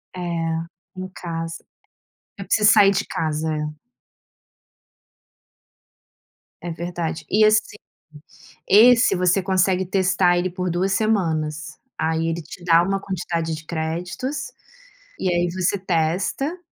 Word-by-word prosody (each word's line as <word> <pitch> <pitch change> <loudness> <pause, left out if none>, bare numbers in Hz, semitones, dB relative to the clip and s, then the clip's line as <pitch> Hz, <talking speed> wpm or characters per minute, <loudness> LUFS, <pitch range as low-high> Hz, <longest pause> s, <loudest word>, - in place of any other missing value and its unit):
É, - - -6 0.8
em 185 0 -5
casa. 165 -1 -5 0.7
Eu 195 - -7
preciso 210 +2 +4
sair 205 -2 +6
de 200 - -1
casa, 155 0 -2
é. 150 0 -5 2.8
É 175 - -4
verdade. 170 -1 -4
E 215 +1 +4
assim, 215 0 +3 0.9
esse 235 +3 +6
você 180 +1 +2
consegue 190 0 +1
testar 185 -1 +2
ele 180 +1 0
por 180 0 -3
2 185 +3 0
semanas, 160 -7 -1 0.2
aí 160 0 0
ele 165 +1 -3
te 175 +2 -12
dá 170 -1 +5
uma 195 +2 -1
quantidade 170 -4 -3
de 155 0 -8
créditos, 175 - -4 0.7
e 185 - 0
aí 175 0 +1
você 185 +2 0
testa, 185 - -1
180 Hz, 120 wpm, -22 LUFS, 165-195 Hz, 2.8 s, sair